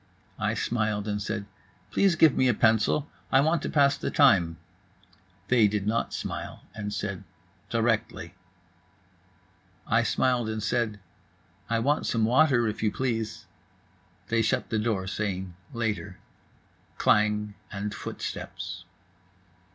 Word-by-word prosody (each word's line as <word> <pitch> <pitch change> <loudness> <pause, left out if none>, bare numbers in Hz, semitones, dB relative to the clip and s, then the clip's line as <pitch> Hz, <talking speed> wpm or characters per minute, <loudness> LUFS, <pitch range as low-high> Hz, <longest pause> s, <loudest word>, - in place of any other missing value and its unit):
I - - 0
smiled 110 -3 -1
and 105 0 -2
said: 105 0 -3 0.5
"Please 195 -3 +3
give 155 -3 +5
me 130 - +3
a 120 - +3
pencil. 115 +7 +3 0.2
I 135 - +6
want 160 +3 +2
to - - -3
pass 140 -2 +3
the - - -2
time." 90 - +4 0.9
They 120 -4 +5
did 100 -1 -2
not 110 +2 0
smile - - -5
and 105 -1 -5
said: 100 -2 -4 0.5
"Directly." 115 -1 -1 1.5
I - - +3
smiled 125 -3 +1
and 110 -1 -3
said: 110 -1 0 0.7
"I 115 - +2
want 140 +6 +1
some 115 -2 +2
water, 125 -1 +4
if 105 - -3
you 110 -1 +2
please." 115 -4 -2 0.8
They 115 0 +2
shut 110 - 0
the 110 - +1
door, 105 -4 -1
saying 95 -2 -3 0.2
"Later." 105 -4 -3 0.8
Klang 105 0 +2 0.2
and 105 0 -4
footsteps. 90 -3 -6
110 Hz, 130 wpm, -27 LUFS, 105-120 Hz, 1.5 s, I